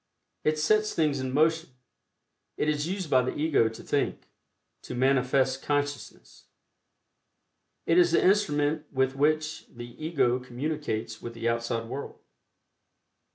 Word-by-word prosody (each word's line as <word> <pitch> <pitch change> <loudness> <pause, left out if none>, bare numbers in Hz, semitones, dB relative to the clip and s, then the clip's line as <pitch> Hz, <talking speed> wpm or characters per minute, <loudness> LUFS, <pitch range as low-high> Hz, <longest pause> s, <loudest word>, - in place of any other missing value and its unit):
It 155 0 +1
sets 215 +8 +2
things 150 -4 +1
in 130 0 -3
motion; 160 +4 +2 0.9
it - - 0
is 150 0 0
used 190 -1 -3
by 130 -3 +4
the 125 - -3
Ego 145 -7 +2
to 110 - -11
think - - -1 0.6
to - - -7
manifest 130 +1 +2
consciousness. 145 -1 -4 1.4
It 165 +2 +4
is 175 -1 +4
the 170 - +3
instrument 155 -6 +2
with 130 0 0
which 155 +2 0
the 120 0 -10
Ego 135 -6 +1
communicates 125 -4 -4
with 115 0 -7
the 115 0 -3
outside 115 0 -1
world. 135 +4 -7
145 Hz, 130 wpm, -27 LUFS, 125-155 Hz, 1.4 s, by